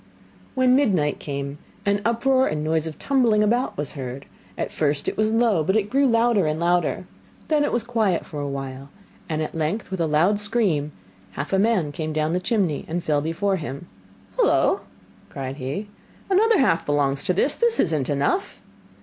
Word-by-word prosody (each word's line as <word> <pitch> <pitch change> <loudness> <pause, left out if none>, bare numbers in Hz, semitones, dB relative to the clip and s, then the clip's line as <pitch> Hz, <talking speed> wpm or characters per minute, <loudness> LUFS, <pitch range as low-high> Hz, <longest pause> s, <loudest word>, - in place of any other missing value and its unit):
When 255 -1 +4
midnight 185 - +2
came, 140 0 -5 0.3
an 200 0 +1
uproar 260 +3 +2
and 150 0 -2
noise 160 0 0
of 155 - -7
tumbling 235 -6 +2
about 240 +5 0
was 145 -2 -3
heard; 130 -1 -7 0.3
at - - -3
first 145 -2 0
it - - -1
was 215 0 +1
low, 225 -7 +2
but 190 +6 +1
it 210 -2 0
grew 275 +2 +3
louder 230 -6 +3
and 155 +1 -1
louder. 175 +1 +1 0.4
Then 300 -2 +3
it 290 - 0
was 240 - 0
quiet 220 -7 0
for 150 - -7
a 145 - -3
while, 135 0 -6 0.4
and 155 -1 -1
at - - -5
length 165 +7 -2
with 190 - -3
a 165 - +1
loud 170 +7 +2
scream, 205 -9 0 0.4
half 145 - -5
a 190 - +3
man 195 -8 +2
came 155 +1 -4
down 155 +1 0
the 180 - +1
chimney 185 -6 0
and 170 +2 -3
fell 150 -2 +1
before 190 +6 0
him. 145 -1 -6 0.5
'Hullo!' - - +3 0.5
cried 135 0 -6
he, 145 +10 -4 0.4
'another 440 +3 +4
half 215 -11 +2
belongs 140 -1 0
to 185 - +2
this. 265 +10 +1
This 470 -1 +1
is 165 - +2
not 140 -5 -1
enough! 145 - -1
175 Hz, 190 wpm, -23 LUFS, 150-225 Hz, 0.5 s, When